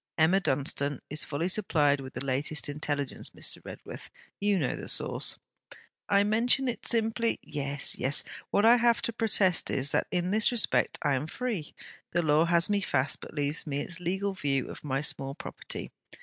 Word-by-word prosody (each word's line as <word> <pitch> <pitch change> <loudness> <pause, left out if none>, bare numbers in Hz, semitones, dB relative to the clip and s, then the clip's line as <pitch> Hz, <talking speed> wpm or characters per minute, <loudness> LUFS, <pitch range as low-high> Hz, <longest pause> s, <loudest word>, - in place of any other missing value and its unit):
'Emma 165 +4 +4
Dunstane 140 -3 -1
is 150 - +2
fully 155 +4 -2
supplied 155 -8 +2
with 130 -1 -9
the - - -5
latest 140 +3 0
intelligence, 145 -1 -2
Mr. - - -3
Redworth. - - -9 0.3
You 205 -1 +2
know 145 -8 -1
the - - -8
source.' - - -1 0.7
'I 200 0 +4
mention 235 +5 +2
it 240 - -3
simply...' 230 0 +1
'Yes, 145 -1 0
yes. 135 +3 +4 0.3
What 205 - +2
I 235 +2 +7
have 235 -1 +2
to 230 - -1
protest 205 -6 +2
is, 140 +1 -1
that - - +1
in 180 0 -1
this 215 +3 +5
respect 240 -3 +1
I 145 - +2
am 135 +3 -1
free. 215 - -4 0.4
The 175 - +2
Law 155 +1 +4
has 170 0 +5
me 205 -1 +1
fast, 140 -7 0
but - - -11
leaves 145 +2 -1
me 140 -1 -2
its 170 +4 -5
legal 190 +3 -1
view 140 -8 -1
of - - -11
my 135 -2 -1
small 135 -2 -3
property. - - -6
165 Hz, 180 wpm, -29 LUFS, 145-205 Hz, 0.7 s, I